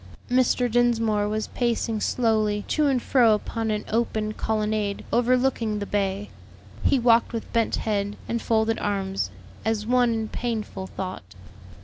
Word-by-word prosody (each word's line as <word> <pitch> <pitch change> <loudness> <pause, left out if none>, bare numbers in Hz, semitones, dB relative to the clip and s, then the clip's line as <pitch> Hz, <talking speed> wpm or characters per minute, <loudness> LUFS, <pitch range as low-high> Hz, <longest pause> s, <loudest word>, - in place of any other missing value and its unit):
Mr. 250 0 +3
Dinsmore 225 -3 +2
was 215 0 -2
pacing 230 -2 -1
slowly 215 -4 +1
to 300 -2 +2
and 265 -2 +2
fro 235 -3 +4
upon 225 +1 -3
an 210 -1 -1
open 215 -1 -1
colonnade 215 -2 -1
overlooking 245 -2 +2
the 205 - -3
bay. 200 0 -2 0.5
He 275 - +4
walked 235 -1 +3
with 230 - -5
bent 230 -1 +2
head 205 -1 -1
and 235 0 -2
folded 225 0 +1
arms, 195 - -1 0.3
as 220 -1 -1
one 245 0 +3
in 225 -1 -1
painful 215 -5 -4
thought. 185 - -7
220 Hz, 140 wpm, -25 LUFS, 210-235 Hz, 0.5 s, fro